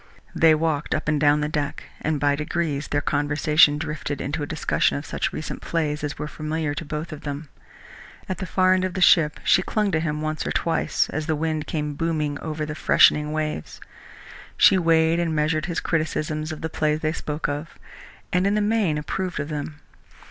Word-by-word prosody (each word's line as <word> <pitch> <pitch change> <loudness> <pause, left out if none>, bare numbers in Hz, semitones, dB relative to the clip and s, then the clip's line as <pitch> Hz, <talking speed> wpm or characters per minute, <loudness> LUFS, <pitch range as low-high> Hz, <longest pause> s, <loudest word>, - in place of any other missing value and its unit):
They 160 -1 +5
walked 155 -2 -1
up - - -4
and 150 -1 +2
down 150 0 +4
the 150 - 0
deck, 150 -2 -3 0.2
and 155 -1 -1
by 145 0 +2
degrees 150 -1 -2
their 145 - 0
conversation 145 +1 +3
drifted 150 -2 -4
into 145 +4 -3
a 145 - -3
discussion 160 -2 0
of 145 - -6
such - - -2
recent 155 - -6
plays 150 -3 -2
as 145 -1 -3
were 150 - -4
familiar 155 0 -3
to 150 - -5
both 155 +2 -5
of 155 - -8
them. 145 0 -6 0.8
At 185 - -4
the 185 - -4
far 185 +1 +3
end 185 0 +1
of 185 0 -2
the - - -2
ship 160 -3 +5
she 185 - +4
clung 210 +1 0
to 160 - +1
him 150 -2 -2
once 155 0 -2
or - - -1
twice 165 -1 0
as 155 0 -3
the 155 - +1
wind 155 0 -2
came 150 -2 -2
booming 150 -2 -1
over 155 -1 -4
the 150 - -5
freshening 150 0 +4
waves. 155 - -3 0.8
She - - +7
weighed 165 -1 +3
and 165 -2 0
measured 155 +1 0
his 170 -2 -2
criticisms 155 -1 -2
of 155 - -7
the 160 - -2
plays 155 0 0
they 155 0 0
spoke 150 -1 -3
of, 145 +3 -5 0.6
and 180 +2 +3
in 200 - +2
the - - +2
main 210 -7 +1
approved 180 +4 -3
of 150 - -3
them. 150 0 -5
155 Hz, 205 wpm, -24 LUFS, 150-165 Hz, 0.8 s, She